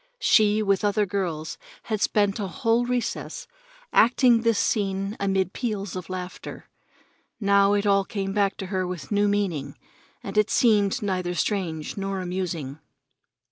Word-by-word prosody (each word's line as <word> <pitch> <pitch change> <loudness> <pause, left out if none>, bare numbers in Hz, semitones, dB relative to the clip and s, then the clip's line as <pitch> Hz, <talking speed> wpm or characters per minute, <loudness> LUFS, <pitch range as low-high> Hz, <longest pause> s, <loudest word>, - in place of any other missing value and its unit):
She, 215 - +4
with 195 -1 +1
other 205 0 +2
girls, 175 -5 -3 0.2
had 215 -2 -3
spent 205 -1 +1
a 200 - -2
whole 235 +2 +1
recess 250 -1 -3 0.5
acting 240 0 +5
this 230 -2 +2
scene 195 -1 0
amid 195 -2 0
peals 210 -7 -3
of 185 -1 -6
laughter. 185 -1 -7 0.7
Now 200 -1 +4
it 205 0 +1
all 195 -1 +4
came 195 -1 -4
back 200 -1 +1
to 195 - -5
her 185 -1 0
with 180 -1 -7
new 205 0 +3
meaning, 175 -9 -1 0.5
and 200 +2 0
it 210 - +2
seemed 210 -1 +3
neither 185 -3 -1
strange 170 -6 -2
nor 195 -1 -3
amusing. 175 -6 -4
200 Hz, 145 wpm, -25 LUFS, 185-210 Hz, 0.7 s, acting